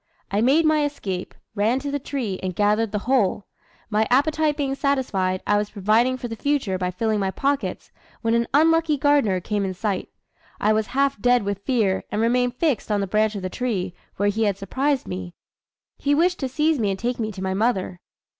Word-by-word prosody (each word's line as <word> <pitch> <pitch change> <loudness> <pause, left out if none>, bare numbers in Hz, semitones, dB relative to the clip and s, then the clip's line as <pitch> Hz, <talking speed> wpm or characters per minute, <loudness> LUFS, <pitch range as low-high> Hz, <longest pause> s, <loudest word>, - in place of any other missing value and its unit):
I 200 +2 +1
made 285 +7 +4
my 310 -1 +3
escape, 195 -11 -4 0.2
ran 220 +4 +1
to 280 +1 -4
the 285 - -1
tree, 245 -9 -3
and 185 -2 -3
gathered 210 +2 +2
the 210 - -1
whole. 230 -6 +1 0.5
My 215 +1 +2
appetite 300 +3 +2
being 275 -2 -1
satisfied, 245 -10 0
I 205 - +3
was 210 0 -1
providing 220 +5 +2
for 245 - -5
the 225 - -5
future 240 -7 -1
by 180 -1 -1
filling 215 +3 -1
my 195 -1 0
pockets, 280 +7 -2 0.3
when 225 0 +2
an 235 0 +2
unlucky 320 +1 +3
gardener 280 -10 +3
came 205 +2 -2
in 190 -1 -3
sight. 200 -1 -2 0.5
I 215 - +3
was 215 0 0
half 275 -6 +1
dead 245 -2 +4
with 200 -1 -3
fear, 215 -7 +1
and 210 - -1
remained 245 +2 +2
fixed 280 -7 0
on 205 - +2
the 200 - 0
branch 215 +2 +1
of 195 - -5
the 185 - -2
tree, 195 -8 -2 0.2
where 205 +1 +2
he 220 +2 0
had 200 -2 0
surprised 265 +7 -1
me. 90 -1 -6 0.6
He 285 0 +2
wished 355 +4 +2
to 265 - -2
seize 300 +2 +1
me 210 -3 +1
and 195 - -1
take 240 +3 -2
me 220 -1 -2
to 190 -1 -6
my 190 0 -1
mother. 190 -4 0
225 Hz, 210 wpm, -23 LUFS, 200-275 Hz, 0.6 s, made